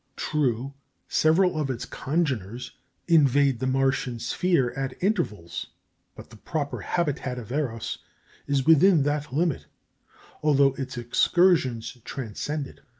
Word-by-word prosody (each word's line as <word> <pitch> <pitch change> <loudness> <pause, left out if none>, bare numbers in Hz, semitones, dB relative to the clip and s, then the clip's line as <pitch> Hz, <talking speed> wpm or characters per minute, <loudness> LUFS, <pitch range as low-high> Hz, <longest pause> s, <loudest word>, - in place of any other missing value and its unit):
True, 135 -2 -1 0.3
several 165 +1 +3
of 140 - -2
its 125 -3 -3
congeners 125 - -2 0.4
invade 140 -5 +4
the 130 - -1
Martian 130 -2 0
sphere 135 0 +1
at 135 -1 -4
intervals; 165 - -1 0.5
but - - -12
the 110 - -13
proper 145 +5 -3
habitat 145 -7 -2
of 120 -2 -8
Eros 125 -6 -3 0.5
is 140 -2 +1
within 160 0 +6
that 145 -1 -1
limit, 145 - 0 0.7
although 140 -3 +4
its 130 -2 -6
excursions 125 -1 +2
transcend 140 +4 -4
it. - - -14
135 Hz, 120 wpm, -26 LUFS, 125-155 Hz, 0.7 s, within